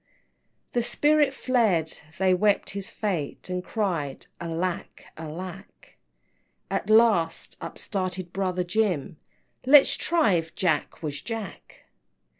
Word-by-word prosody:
XIV. - - -42
The 240 - +2
spirit 295 +3 +3
fled 220 - +1 0.2
they 190 0 +3
wept 205 +3 +2
his 195 -1 -4
fate, 185 -7 -3
And 180 0 -2
cried, 175 -12 -2
Alack, 170 +1 -4
alack! 180 +5 -9 0.7
At - - -2
last 215 -7 +3
up - - -6
started 185 -3 -3
brother 185 -2 -1
Jim, 180 -6 -1 0.5
"Let's 275 +2 +7
try 325 - +2
if 165 -2 -2
Jack, 170 -2 -1
was 145 -2 -4
Jack!" 225 -5 -7
185 Hz, 115 wpm, -26 LUFS, 170-220 Hz, 0.7 s, Let's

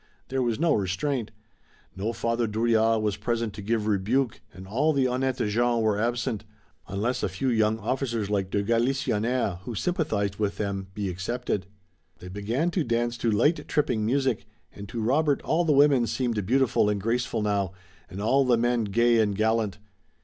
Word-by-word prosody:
There 130 0 0
was 120 -1 0
no 165 +1 +3
restraint. 105 +6 -1 0.7
No 100 +4 -2
Father 115 0 -1
Drouillard 110 0 +2
was 105 -2 0
present 115 0 -2
to 105 - -8
give 110 +1 -1
rebuke 110 +5 0
and 95 +2 -11
all 140 +10 +1
the 135 -2 +2
honnêtes 130 -2 0
gens 120 +2 +1
were 105 -2 +1
absent, 120 -1 -1 0.4
unless 105 +7 -1
a - - 0
few 95 +9 -2
young 110 -2 +2
officers 115 -1 -2
like 100 -2 -1
de 100 +1 0
Galisonnière, 115 -3 0
who 110 +5 -7
sympathized 105 - -1
with 105 -2 -1
them, 100 -2 -3
be 105 -1 -2
excepted. 95 +1 -3 0.5
They 90 +1 -10
began 115 - -1
to 175 -2 0
dance 120 -1 0
to 115 - +1
light, 145 +10 +2
tripping 125 -7 0
music, 130 +1 0 0.3
and 100 0 -9
to 120 - -4
Robert 140 +5 +2
all 170 +2 +1
the 160 - +2
women 140 -4 +5
seemed 115 -5 -1
beautiful 125 -4 +3
and 105 -1 0
graceful 115 +1 -1
now, 100 -3 0 0.4
and 95 0 -8
all 130 +7 +3
the 125 -2 +3
men 120 -1 +1
gay 115 +3 +3
and 105 -2 +2
gallant. 110 -1 +1
115 Hz, 175 wpm, -26 LUFS, 105-125 Hz, 0.7 s, women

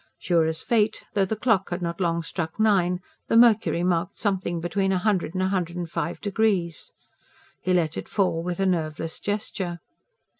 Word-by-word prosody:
Sure 170 -3 +2
as 160 0 -3
fate, 220 -2 +1
though 200 -3 +3
the 220 - -2
clock 215 -4 +1
had 175 - -2
not 170 +1 -3
long 170 -1 +1
struck 165 +2 -4
nine, 185 -4 +3 0.3
the 225 - +3
mercury 225 -7 +5
marked 175 -1 0
something 190 -4 -1
between 190 +3 0
a 190 - +2
hundred 185 -3 0
and 185 - +1
a 190 - +1
hundred 175 -3 -1
and 175 -2 -4
five 165 -3 -2
degrees. 200 -6 0 0.7
He 185 - -1
let 165 -3 +2
it - - -6
fall 185 -5 +1
with 175 +1 -3
a 195 - +2
nerveless 160 -3 -1
gesture. 200 -4 -3
180 Hz, 185 wpm, -25 LUFS, 170-200 Hz, 0.7 s, mercury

